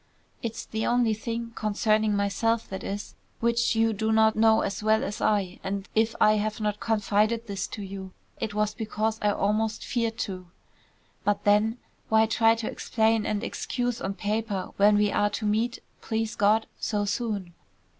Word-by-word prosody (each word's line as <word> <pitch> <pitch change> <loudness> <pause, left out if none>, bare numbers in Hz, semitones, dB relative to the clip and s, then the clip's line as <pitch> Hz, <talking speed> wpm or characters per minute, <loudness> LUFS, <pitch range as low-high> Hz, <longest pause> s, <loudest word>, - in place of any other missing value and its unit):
It's 230 0 -4
the 220 0 -3
only 240 -2 +3
thing, 230 +1 -4
concerning 215 0 +1
myself 225 +3 0
that 190 - -6
is, 200 +1 -5 0.3
which 235 0 +2
you 225 0 +3
do 220 +2 -1
not 220 0 +4
know 220 0 +5
as 195 - -3
well 215 +1 +3
as 205 - -4
I, 200 -4 +1
and 195 0 -3
if 220 +1 +2
I 215 0 +5
have 215 +1 -2
not 210 -1 -1
confided 215 +1 +1
this 200 -3 -3
to 210 - -7
you, 190 -1 -7 0.3
it 220 -3 -3
was 210 0 +1
because 220 0 -2
I 210 - +3
almost 215 +2 0
feared 230 -2 -1
to. 185 -2 -7 0.8
But 205 -1 0
then, 210 +3 +3 0.3
why 220 0 +5
try 225 0 +3
to 225 -1 -4
explain 220 -1 +1
and 210 +1 -1
excuse 245 -1 -2
on 195 +1 -3
paper 210 -2 -2
when 205 +1 +5
we 210 0 +2
are 205 - +2
to 215 +1 -4
meet, 225 +3 +1 0.2
please 225 0 -2
God, 215 +1 +3
so 205 -2 -1
soon. 200 -4 -2
215 Hz, 175 wpm, -27 LUFS, 205-225 Hz, 0.8 s, know